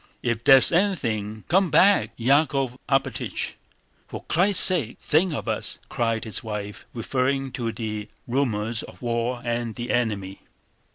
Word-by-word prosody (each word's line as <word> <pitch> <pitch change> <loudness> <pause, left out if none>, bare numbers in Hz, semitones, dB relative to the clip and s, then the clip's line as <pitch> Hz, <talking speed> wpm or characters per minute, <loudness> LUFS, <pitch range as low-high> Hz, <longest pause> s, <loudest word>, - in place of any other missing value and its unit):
"If 120 -1 -1
there 135 - +9
is 130 - +3
anything... 115 - 0
come 185 +2 +3
back, 200 +5 +4
Yákov 135 0 +2
Alpátych! 135 -1 -1 0.5
For - - -8
Christ's 190 +4 +3
sake 155 - +1
think 170 +4 +2
of 145 - -4
us!" - - -1
cried 115 -2 -1
his 110 -3 -3
wife, 105 -2 -6
referring 130 +3 -1
to 120 -2 -3
the 105 -1 -5 0.2
rumors 115 -4 0
of - - -12
war 120 +1 -1
and 120 -1 -2
the 120 0 -4
enemy. 105 -5 -1
120 Hz, 145 wpm, -24 LUFS, 110-140 Hz, 0.5 s, there